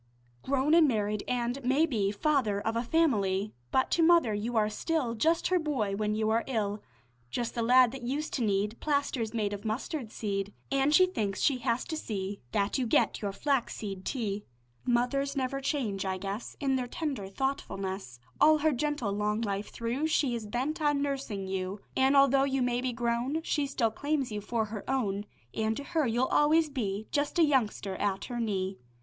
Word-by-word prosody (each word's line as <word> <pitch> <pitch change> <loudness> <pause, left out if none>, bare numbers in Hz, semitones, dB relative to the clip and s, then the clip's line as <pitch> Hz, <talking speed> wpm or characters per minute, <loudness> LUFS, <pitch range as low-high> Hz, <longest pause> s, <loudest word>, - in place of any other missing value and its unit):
Grown 275 +3 +1
and 330 -2 +7
married 210 -4 0
an' 245 0 -1
maybe 255 -6 +2
Father 220 -3 +1
of 225 +2 -2
a 230 - +1
family, 215 -9 +1 0.2
But 260 - +1
to 340 - +3
mother 330 -9 +5
you 225 +3 -2
are 210 -1 +4
still 255 +3 -1
Just 320 +9 +2
her 365 -1 +3
boy 255 -11 -1
when 210 +1 -1
you 215 0 +1
are 230 +1 +2
ill; 210 -5 -1 0.5
Just 235 - -2
the 235 - -2
lad 250 +1 +6
that 270 0 -7
used 280 +6 -3
to 250 - 0
need 205 +1 0
Plasters 280 -6 0
made 210 -3 -1
of 200 0 -6
mustard 225 +2 -3
seed; 200 -1 -3 0.2
An' 275 +1 +3
she 340 +5 +6
thinks 210 - -2
she 270 -3 +2
has 240 0 0
to 320 - -4
see 200 -8 -4
That 200 +6 0
you 250 - 0
get - - +2
your 200 -2 -1
flaxseed 210 -6 -2
tea. 210 -5 -2 0.4
Mothers 275 +4 +1
never 275 0 -1
change, 240 -9 -1
I 190 -1 -2
guess, 200 +4 -5
In 270 -2 +1
their 250 -1 -2
tender 270 -8 -3
thoughtfulness. 195 - -3 0.2
All 310 0 +6
her 310 +1 +2
gentle 290 -5 -1
long 210 +2 0
life 200 -2 -2
through 240 +7 -2
She 285 -5 +1
is 225 -3 -4
bent 260 +9 -2
on 290 -1 +2
nursing 270 -9 -3
you; 190 +1 -3 0.2
An' 265 +1 +4
although 275 -1 +6
you 270 -2 +1
may 245 0 0
be 255 0 -1
grown, 240 +6 -1
She 295 -3 0
still 235 -5 0
claims 285 +1 -1
you 210 0 -3
for 220 +2 -1
her 210 -1 -6
own, 210 -6 -1 0.3
An' 220 0 0
to 285 - -5
her 315 -2 0
you'll 240 +3 +2
always 305 +3 +3
be 215 -6 -2
Just 290 +3 0
a 340 - +6
youngster 225 -9 +1
at 195 -2 -1
her 245 -2 -4
knee. 195 -4 -2
240 Hz, 190 wpm, -30 LUFS, 210-280 Hz, 0.5 s, and